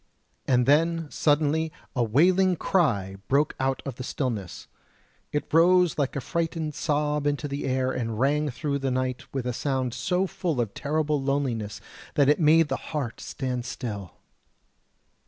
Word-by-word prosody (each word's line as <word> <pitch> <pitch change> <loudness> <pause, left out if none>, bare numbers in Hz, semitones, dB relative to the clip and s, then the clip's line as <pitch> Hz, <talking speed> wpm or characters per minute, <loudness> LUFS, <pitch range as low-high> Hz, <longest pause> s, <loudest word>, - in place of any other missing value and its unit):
And 125 -2 +3
then, 165 +2 +2
suddenly, 155 +1 +2 0.2
a 125 - +2
wailing 180 - +4
cry 105 - +1
broke 145 +3 +2
out 130 0 0
of 135 -4 -5
the 130 - -5
stillness; 115 - -4 0.6
it 150 - -3
rose 175 0 +5
like 140 -2 0
a 140 - -2
frightened 165 0 -2
sob 150 0 0
into 145 0 -1
the 140 0 -4
air 130 0 +1
and 115 -4 -3
rang 145 +3 +2
through 140 +3 -2
the 135 0 -1
night 130 -1 -2
with 135 -2 -3
a 125 - -1
sound 130 -2 -1
so 180 +10 0
full 180 -7 -2
of 115 -4 -1
terrible 150 0 0
loneliness 135 -7 -2 0.3
that 140 -1 +4
it 150 - +4
made 160 0 +5
the - - -1
heart 140 -7 -3
stand 125 -2 -3
still. 105 -8 -6
140 Hz, 155 wpm, -26 LUFS, 125-155 Hz, 0.6 s, rose